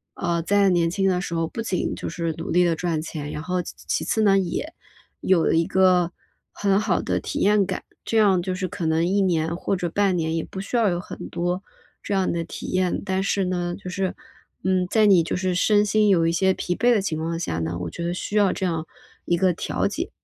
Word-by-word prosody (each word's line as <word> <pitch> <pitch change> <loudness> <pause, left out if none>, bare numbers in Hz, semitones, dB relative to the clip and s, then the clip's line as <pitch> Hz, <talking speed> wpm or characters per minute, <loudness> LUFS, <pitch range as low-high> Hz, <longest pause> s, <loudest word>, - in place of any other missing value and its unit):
呃， 170 -1 -1
在 200 +3 +3
年 170 -2 +2
轻 195 +2 0
的 180 -1 +1
时 175 - -5
候 165 0 0
不 230 - -5
仅 190 -5 -1
就 - - -5
是 165 -2 -2
努 - - -5
力 180 +1 +4
地 170 -1 +2
赚 165 -1 -1
钱， 150 -2 -6
然 150 - -5
后 180 +2 -1
其 - - -8
其 - - 0
次 220 - +1
呢， 195 -2 +5
也 190 - -3 0.5
有 185 -3 +3
一 165 - +3
个 180 -2 +3 0.4
很 200 -1 +1
好 205 -4 +1
的 - - 0
体 - - -4
验 205 0 +4
感。 185 - -4 0.2
这 225 - -1
样 195 -4 +4
就 185 +1 -3
是 185 0 -2
可 180 -1 -5
能 160 +1 +2
1 200 +2 +2
年 170 -3 +1
或 190 - -1
者 175 -1 -2
半 195 +1 +1
年 160 -1 -1
也 165 - -1
不 190 - -8
需 200 - -5
要 225 -3 +3
有 175 -1 -1
很 180 - -8
多 175 +2 -2 0.4
这 - - -3
样 190 -1 +1
的 170 -1 -2
体 - - -8
验， 185 -1 0
但 190 -1 0
是 195 0 0
呢， 175 -1 -2
就 190 -2 -8
是， 190 0 -2 0.5
嗯， 185 -1 +1
在 220 +1 +4
你 190 -4 +6
就 - - -2
是 185 -1 0
身 205 +3 +3
心 210 0 +3
有 170 -4 +4
一 - - +2
些 190 +3 +2
疲 180 -1 -2
惫 245 +4 +3
的 220 - +3
情 165 -5 -2
况 165 +1 -2
下 85 - -2
呢， 85 +1 -2
我 85 - -3
觉 170 - -6
得 170 - -1
需 195 +3 -5
要 200 -2 +4
这 190 - -2
样 165 -2 -2 0.4
一 175 - +1
个 185 0 +3
调 - - -1
节。 - - -4
180 Hz, 260 characters per minute, -23 LUFS, 170-195 Hz, 0.5 s, 你